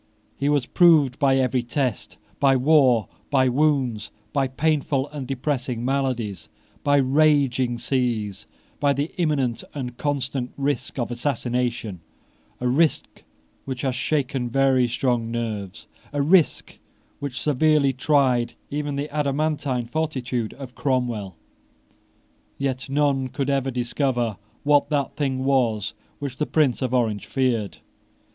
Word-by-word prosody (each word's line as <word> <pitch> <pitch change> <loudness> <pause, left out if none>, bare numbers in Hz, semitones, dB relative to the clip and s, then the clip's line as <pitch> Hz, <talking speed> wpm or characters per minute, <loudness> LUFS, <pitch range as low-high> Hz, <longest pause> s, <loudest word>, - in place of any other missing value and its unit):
He 140 +1 0
was 145 -4 +2
proved 150 -6 +4
by 135 -1 +4
every 130 -1 +1
test; 125 - -2 0.2
by 135 -1 +4
war, 130 -5 +4 0.2
by 130 -3 +3
wounds, 125 -6 +1 0.2
by 140 -2 +2
painful 140 0 0
and 145 -4 -6
depressing 130 -3 -2
maladies, 130 -7 -2 0.3
by 145 0 +4
raging 135 -3 +3
seas, 120 -5 -2 0.3
by 145 -1 +3
the 140 +3 -2
imminent 135 -8 0
and 125 -4 -5
constant 135 -3 -2
risk 140 0 -2
of 120 -2 -2
assassination, 120 -5 -2 0.6
a 125 - -1
risk 150 +6 +1 0.4
which 130 -2 -4
has 130 -2 +1
shaken 130 -2 -1
very 130 0 +3
strong 120 -1 0
nerves, 110 -5 -4 0.3
a 145 - -2
risk 160 -3 +2 0.4
which 135 -3 -4
severely 150 -1 +3
tried 130 -3 +2 0.2
even 145 0 -2
the 140 +1 -2
adamantine 145 -3 0
fortitude 125 -4 -2
of 135 -3 -9
Cromwell. 120 - -1 1.2
Yet 135 -1 -2
none 140 -2 +1
could 135 +2 -2
ever 135 -1 0
discover 120 -3 -1 0.3
what 145 0 +3
that 145 -3 -1
thing 130 -3 -1
was 120 -7 +1 0.2
which 140 -2 -5
the 150 - -1
Prince 145 -6 +2
of 130 -2 -1
Orange 115 -5 0
feared. 120 -7 0
130 Hz, 125 wpm, -24 LUFS, 120-145 Hz, 1.2 s, proved